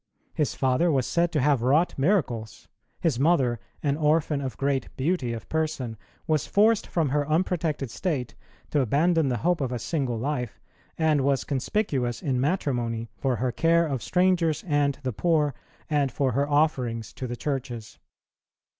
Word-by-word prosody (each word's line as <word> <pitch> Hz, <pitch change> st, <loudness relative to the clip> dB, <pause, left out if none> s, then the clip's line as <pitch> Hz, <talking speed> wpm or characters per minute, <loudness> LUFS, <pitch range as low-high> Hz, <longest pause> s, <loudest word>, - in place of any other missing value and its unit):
His 150 Hz, -, -1 dB
father 135 Hz, +6 st, +2 dB
was 130 Hz, -4 st, +1 dB
said 170 Hz, 0 st, +1 dB
to 150 Hz, -, +2 dB
have 140 Hz, -2 st, +3 dB
wrought 145 Hz, +8 st, +3 dB
miracles; 125 Hz, -, -1 dB, 0.3 s
his 155 Hz, -8 st, +1 dB
mother, 135 Hz, -6 st, +2 dB, 0.2 s
an 145 Hz, -1 st, +1 dB
orphan 150 Hz, -1 st, +2 dB
of 130 Hz, -2 st, -5 dB
great 140 Hz, -1 st, 0 dB
beauty 135 Hz, -3 st, 0 dB
of 115 Hz, -1 st, -6 dB
person, 155 Hz, -7 st, -2 dB, 0.3 s
was 155 Hz, -3 st, 0 dB
forced 215 Hz, +1 st, +3 dB
from 160 Hz, -5 st, 0 dB
her 145 Hz, +2 st, 0 dB
unprotected 155 Hz, -5 st, 0 dB
state 130 Hz, -, -2 dB, 0.4 s
to 150 Hz, -, +2 dB
abandon 155 Hz, +5 st, +2 dB
the 125 Hz, -, 0 dB
hope 175 Hz, -3 st, +2 dB
of 130 Hz, -2 st, -1 dB
a 125 Hz, -, -1 dB
single 130 Hz, -1 st, -2 dB
life, 125 Hz, -2 st, -3 dB, 0.4 s
and 155 Hz, -3 st, +2 dB
was 135 Hz, -1 st, +1 dB
conspicuous 135 Hz, -, -1 dB
in 130 Hz, -3 st, 0 dB
matrimony 120 Hz, -, -1 dB
for 130 Hz, +2 st, 0 dB
her 125 Hz, +2 st, -1 dB
care 170 Hz, +5 st, +3 dB
of 135 Hz, -6 st, -2 dB
strangers 180 Hz, -4 st, +2 dB
and 145 Hz, -4 st, +1 dB
the 130 Hz, -2 st, -2 dB
poor, 150 Hz, +1 st, +1 dB, 0.3 s
and 145 Hz, -4 st, +1 dB
for 135 Hz, -2 st, 0 dB
her 140 Hz, +4 st, 0 dB
offerings 125 Hz, -7 st, 0 dB
to 130 Hz, -, -5 dB
the 120 Hz, -, -4 dB
churches. 130 Hz, -6 st, -4 dB
140 Hz, 165 wpm, -26 LUFS, 125-160 Hz, 0.4 s, have